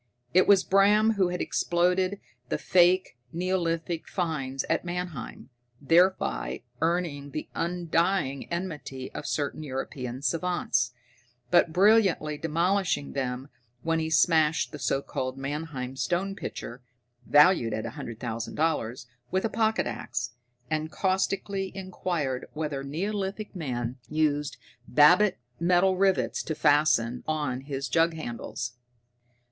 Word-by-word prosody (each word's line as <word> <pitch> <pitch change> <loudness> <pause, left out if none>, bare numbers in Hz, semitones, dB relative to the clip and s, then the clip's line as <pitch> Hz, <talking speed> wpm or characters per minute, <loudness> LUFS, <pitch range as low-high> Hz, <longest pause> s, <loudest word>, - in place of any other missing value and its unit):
It 185 - +5
was 200 -2 +6
Bram 210 +3 +4
who 200 -4 +2
had 180 0 -3
exploded 180 +3 +1 0.3
the - - 0
faked 180 +1 +4 0.2
neolithic 170 -2 -1
finds 145 -8 -2
at - - 0
Mannheim, 175 -9 -5 0.3
thereby 175 +6 +2 0.2
earning 165 -4 0
the 155 +2 -5
undying 170 -4 0
enmity 150 -7 -5
of 145 - -6
certain 145 +1 -2
European 130 -2 -5
savants, 165 -8 0 0.6
but 175 -2 +5
brilliantly 185 -6 +3
demolishing 170 0 0
them 130 0 -3 0.3
when 165 0 +1
he 160 0 -1
smashed 160 0 +3
the 150 - -8
so 135 +1 0
called 130 0 -4
Mannheim 135 -2 -4
stone 180 +8 -1
pitcher 120 -8 -7 0.5
(valued 150 -6 +5
at 110 +1 -3
a 115 - -4
hundred 120 -5 -7
thousand 115 -1 -4
dollars) 130 -7 -1 0.2
with 190 +2 0
a - - +1
pocket 220 -1 +1
axe, 120 +1 -4 0.4
and 155 +2 -2
caustically 195 0 -1
inquired 175 -8 -3
whether 150 -3 -3
neolithic 195 +7 -3
man 125 -6 -3
used 150 -1 0 0.3
babbit 180 +7 +5 0.2
metal 180 +2 +3
rivets 190 0 +2
to 160 - -4
fasten 145 -6 +3
on 145 -5 -1
his 140 -1 -3
jug 165 +4 +2
handles. 120 -4 -5
160 Hz, 120 wpm, -27 LUFS, 135-185 Hz, 0.6 s, was